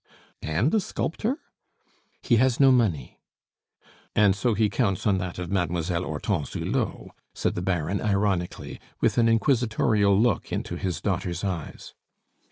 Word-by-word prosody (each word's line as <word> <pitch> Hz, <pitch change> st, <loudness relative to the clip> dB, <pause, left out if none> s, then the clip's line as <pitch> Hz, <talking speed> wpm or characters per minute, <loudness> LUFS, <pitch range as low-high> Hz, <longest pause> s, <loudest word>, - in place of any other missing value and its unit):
"And 85 Hz, -, 0 dB
a 220 Hz, -, +4 dB
sculptor?" 215 Hz, -, -2 dB, 0.9 s
"He 120 Hz, -, +3 dB
has 130 Hz, +1 st, +2 dB
no 135 Hz, -1 st, +7 dB
money." 100 Hz, -, 0 dB, 1.0 s
"And 100 Hz, -2 st, +4 dB
so 110 Hz, +3 st, 0 dB
he 110 Hz, +1 st, +3 dB
counts 100 Hz, -4 st, -1 dB
on 100 Hz, -3 st, +3 dB
that 90 Hz, -1 st, -5 dB
of 90 Hz, -1 st, -5 dB
Mademoiselle 85 Hz, -1 st, -1 dB
Hortense 75 Hz, -1 st, -2 dB
Hulot?" -, -, -2 dB, 0.2 s
said -, -, 0 dB
the -, -, -3 dB
Baron 90 Hz, 0 st, -1 dB
ironically, 100 Hz, -4 st, -1 dB, 0.2 s
with -, -, +2 dB
an 115 Hz, -1 st, +4 dB
inquisitorial 110 Hz, -4 st, +2 dB
look 115 Hz, -5 st, +1 dB
into -, -, -3 dB
his 90 Hz, -3 st, -3 dB
daughter's 85 Hz, +1 st, -2 dB
eyes. 90 Hz, -6 st, -5 dB
100 Hz, 140 wpm, -26 LUFS, 90-115 Hz, 1.0 s, no